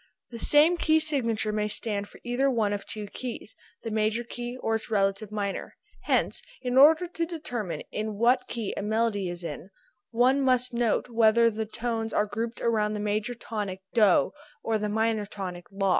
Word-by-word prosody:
The 230 Hz, -, -7 dB
same 305 Hz, +7 st, +5 dB
key 315 Hz, -1 st, +3 dB
signature 230 Hz, -9 st, 0 dB
may 210 Hz, 0 st, 0 dB
stand 205 Hz, -1 st, -3 dB
for -, -, -15 dB
either 250 Hz, +3 st, +1 dB
one 220 Hz, -5 st, +1 dB
of 205 Hz, -, -5 dB
two 215 Hz, -1 st, -5 dB
keys, 230 Hz, +1 st, -7 dB, 0.3 s
the 225 Hz, -, -4 dB
major 215 Hz, +2 st, +1 dB
key, 240 Hz, +1 st, -6 dB
or 225 Hz, -, -1 dB
its 225 Hz, -, -2 dB
relative 200 Hz, 0 st, 0 dB
minor, 200 Hz, -2 st, -3 dB, 0.3 s
hence -, -, +1 dB, 0.2 s
in 250 Hz, -1 st, -2 dB
order 310 Hz, +6 st, +7 dB
to 335 Hz, -1 st, -3 dB
determine 245 Hz, -, -4 dB
in 215 Hz, 0 st, -3 dB
what 250 Hz, +4 st, +3 dB
key 225 Hz, -4 st, -4 dB
a -, -, -3 dB
melody 210 Hz, -2 st, 0 dB
is 175 Hz, 0 st, -6 dB, 0.6 s
one 255 Hz, +4 st, +3 dB
must 255 Hz, -2 st, +2 dB
note 235 Hz, 0 st, +1 dB
whether 230 Hz, 0 st, +4 dB
the 220 Hz, 0 st, -3 dB
tones 225 Hz, 0 st, -3 dB
are 210 Hz, -, +2 dB
grouped 225 Hz, +3 st, -4 dB
about 215 Hz, -2 st, +1 dB
the -, -, -3 dB
major 210 Hz, +3 st, -1 dB
tonic 205 Hz, -5 st, -5 dB
DO 205 Hz, -, +4 dB, 0.3 s
or 220 Hz, -1 st, 0 dB
the 210 Hz, 0 st, -2 dB
minor 220 Hz, -1 st, 0 dB
tonic 185 Hz, -4 st, -6 dB
LA. 195 Hz, 0 st, 0 dB
225 Hz, 180 wpm, -27 LUFS, 210-245 Hz, 0.6 s, order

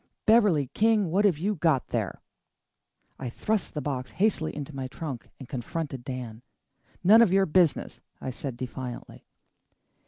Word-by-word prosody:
"Beverley 210 Hz, -10 st, +5 dB
King, 215 Hz, -5 st, +3 dB
what 200 Hz, +4 st, +3 dB
have 185 Hz, -7 st, +3 dB
you 195 Hz, +7 st, 0 dB
got 160 Hz, -7 st, +1 dB
there?" -, -, -3 dB, 1.0 s
I 130 Hz, -, -4 dB
thrust 210 Hz, -, -1 dB
the 150 Hz, -, -3 dB
box 130 Hz, -3 st, -3 dB
hastily 190 Hz, -6 st, 0 dB
into 145 Hz, 0 st, -6 dB
my 135 Hz, -1 st, -3 dB
trunk 135 Hz, -2 st, -7 dB
and 130 Hz, -, -10 dB
confronted 135 Hz, +1 st, -4 dB
Dan. 125 Hz, -3 st, -6 dB, 0.6 s
"None 215 Hz, +5 st, +8 dB
of 225 Hz, -6 st, +5 dB
your 195 Hz, 0 st, +4 dB
business," 170 Hz, -1 st, +2 dB, 0.2 s
I 130 Hz, -, -4 dB
said 130 Hz, -1 st, -6 dB
defiantly. 125 Hz, 0 st, -7 dB
150 Hz, 150 wpm, -27 LUFS, 130-195 Hz, 1.0 s, None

